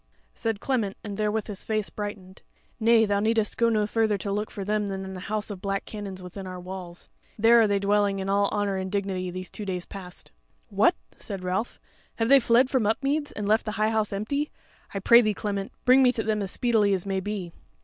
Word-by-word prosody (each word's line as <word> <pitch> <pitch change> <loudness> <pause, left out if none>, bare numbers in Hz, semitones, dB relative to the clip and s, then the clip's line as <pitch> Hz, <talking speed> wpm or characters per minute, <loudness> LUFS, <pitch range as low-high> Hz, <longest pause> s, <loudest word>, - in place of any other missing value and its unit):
Said 225 -2 -2
Clement, 225 -7 -1
and 205 -2 -5
therewith 215 +1 0
his 205 -4 -7
face 215 -2 -1
brightened: 205 -3 -7 0.4
"Nay, 225 0 +5
thou 205 -1 +1
needest 220 0 +1
go 235 -1 +3
no 215 -2 +2
further 220 -1 +1
to 200 +1 -4
look 210 +2 -2
for 195 - -6
them 210 0 0
than 190 -1 -5
the 185 - -6
House 215 +2 -3
of 190 -3 -7
Black 195 0 -2
Canons 195 -3 -7
within 185 +1 -8
our 185 0 -6
walls: 180 -1 -8 0.3
there 230 +2 +6
are 220 - +4
they 200 -1 +2
dwelling 200 0 +2
in 190 0 -3
all 200 +1 +2
honour 205 -2 0
and 190 0 -4
dignity 190 -2 -2
these 185 +1 -6
two 210 - -6
days 180 -3 -3
past." 185 -3 -10 0.4
"What!" - - +3 0.2
said 195 -2 -6
Ralph, 185 +6 -2 0.4
"have 225 0 0
they 275 0 +8
fled 240 +1 +4
from 255 -5 +1
Upmeads, 285 +6 0
and 210 -1 -4
left 215 +2 +3
the 215 - -4
High 215 0 +1
House 220 -2 0
empty? 280 +9 -2 0.4
I - - -4
pray 235 +5 +7
thee, 215 -3 0
Clement, 200 -2 -3
bring 255 +2 +7
me 250 -1 +6
to 225 - -2
them 215 -1 0
as 195 - -3
speedily 220 -2 +2
as 185 - -4
may 195 -1 -1
be." 190 -3 -4
205 Hz, 220 wpm, -26 LUFS, 195-220 Hz, 0.4 s, they